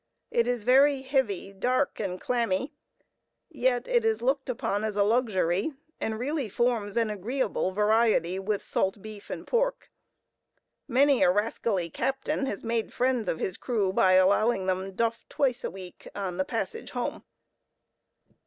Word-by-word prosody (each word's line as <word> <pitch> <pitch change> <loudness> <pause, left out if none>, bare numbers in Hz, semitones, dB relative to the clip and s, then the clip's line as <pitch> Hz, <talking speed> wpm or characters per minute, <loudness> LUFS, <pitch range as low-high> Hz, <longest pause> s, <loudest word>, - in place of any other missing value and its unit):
It 235 0 +2
is 245 -3 -1
very 270 +3 +4
heavy, 245 -8 -1
dark, 250 +7 0
and 185 -3 -3
clammy, 235 0 -1 0.8
yet 255 -4 0
it 480 -2 +2
is 445 - 0
looked 270 +1 0
upon 215 -4 -1
as 215 -2 -2
a 205 - +3
luxury, 205 - +1 0.3
and 220 0 -2
really 270 0 -2
forms 230 -2 0
an 225 -2 +2
agreeable 210 0 -1
variety 210 -3 +2
with 205 +1 -2
salt 190 +2 -1
beef 215 -2 -10
and - - -6
pork. - - -1 1.0
Many 275 +1 +4
a - - +6
rascally 200 -3 0
captain 270 - -1
has 205 - -4
made 230 -1 -1
friends 250 -5 0
of - - -1
his 185 - -3
crew 210 -7 0
by 185 -1 +4
allowing 195 +2 +4
them 190 +1 -2
duff 230 +3 -2
twice 255 -3 0
a - - -1
week 185 -2 -11
on 190 -3 -3
the 185 - 0
passage 345 - -4
home. - - -4
225 Hz, 155 wpm, -27 LUFS, 195-255 Hz, 1.0 s, a